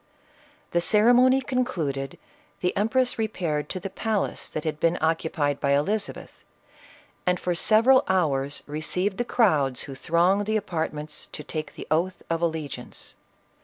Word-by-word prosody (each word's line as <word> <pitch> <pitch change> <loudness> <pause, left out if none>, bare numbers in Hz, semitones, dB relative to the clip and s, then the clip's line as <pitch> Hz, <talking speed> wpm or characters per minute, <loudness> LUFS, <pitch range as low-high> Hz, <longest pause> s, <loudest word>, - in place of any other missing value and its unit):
The 170 - +2
ceremony 245 +7 +5
concluded, 160 - -2 0.4
the 180 - 0
empress 245 +4 +1
re 220 - +2
paired 155 -8 -2
to 185 - -3
the 190 +1 -6
palace 220 -2 -2
that 155 - -4
had 155 -1 -3
been 165 +2 +2
occupied 160 -3 0
by 140 0 +2
Eliza 200 +9 +1
beth, - - -14 0.8
and 180 0 +2
for 180 - -1
several 230 +9 +5
hours 145 -7 0
received 155 +6 -1
the - - +2
crowds 150 - +2
who 135 - -8
thronged 175 +8 +2
the 220 0 +2
apartments 160 -6 -4
to 150 - -6
take 155 +1 -5
the - - -7
oath 175 +4 0
of 165 0 0
allegiance. 160 -4 -4
170 Hz, 150 wpm, -25 LUFS, 150-210 Hz, 0.8 s, ceremony